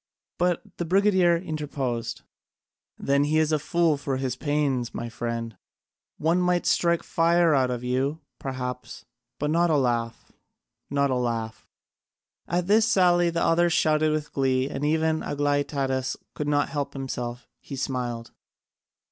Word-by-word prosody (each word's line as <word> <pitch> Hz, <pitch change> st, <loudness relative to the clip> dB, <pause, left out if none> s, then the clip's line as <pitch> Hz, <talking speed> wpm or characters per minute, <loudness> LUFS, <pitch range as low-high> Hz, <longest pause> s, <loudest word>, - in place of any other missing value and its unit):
But 175 Hz, -1 st, +1 dB
the 175 Hz, -, -2 dB
brigadier 185 Hz, -1 st, +4 dB
interposed, 145 Hz, -8 st, -4 dB, 0.7 s
"Then 140 Hz, +1 st, +2 dB
he 155 Hz, +1 st, +1 dB
is 155 Hz, 0 st, +2 dB
a 155 Hz, -, +2 dB
fool 165 Hz, +1 st, +1 dB
for 140 Hz, -1 st, -2 dB
his 130 Hz, -2 st, -2 dB
pains, 140 Hz, -4 st, -1 dB
my 120 Hz, -, -4 dB
friend: 115 Hz, -1 st, -4 dB, 0.6 s
one 165 Hz, +4 st, +2 dB
might 180 Hz, 0 st, +1 dB
strike 170 Hz, -1 st, +2 dB
fire 170 Hz, 0 st, +3 dB
out 130 Hz, -2 st, +3 dB
of 125 Hz, -1 st, -3 dB
you, 130 Hz, +5 st, -1 dB, 0.2 s
perhaps, 125 Hz, -2 st, -5 dB, 0.3 s
but 150 Hz, +1 st, -1 dB
not 170 Hz, +2 st, +3 dB
a 155 Hz, -, +3 dB
laugh, 120 Hz, -3 st, -1 dB, 0.6 s
not 140 Hz, -1 st, +1 dB
a -, -, +1 dB
laugh." 115 Hz, -3 st, -3 dB, 0.8 s
At 175 Hz, 0 st, 0 dB
this 215 Hz, +3 st, +4 dB
sally 175 Hz, -5 st, +4 dB
all 170 Hz, -, -1 dB
the 170 Hz, -, 0 dB
others 170 Hz, 0 st, +3 dB
shouted 155 Hz, 0 st, +3 dB
with 155 Hz, -1 st, -3 dB
glee, 130 Hz, -1 st, +1 dB
and 140 Hz, 0 st, -5 dB
even 160 Hz, +1 st, +1 dB
Aglaïtadas 140 Hz, -3 st, -1 dB, 0.2 s
could 150 Hz, -, -4 dB
not 145 Hz, -1 st, +1 dB
help 140 Hz, -2 st, -3 dB
himself: 125 Hz, -3 st, -5 dB
he 140 Hz, -, -8 dB
smiled. 125 Hz, -3 st, -3 dB
145 Hz, 150 wpm, -26 LUFS, 130-165 Hz, 0.8 s, brigadier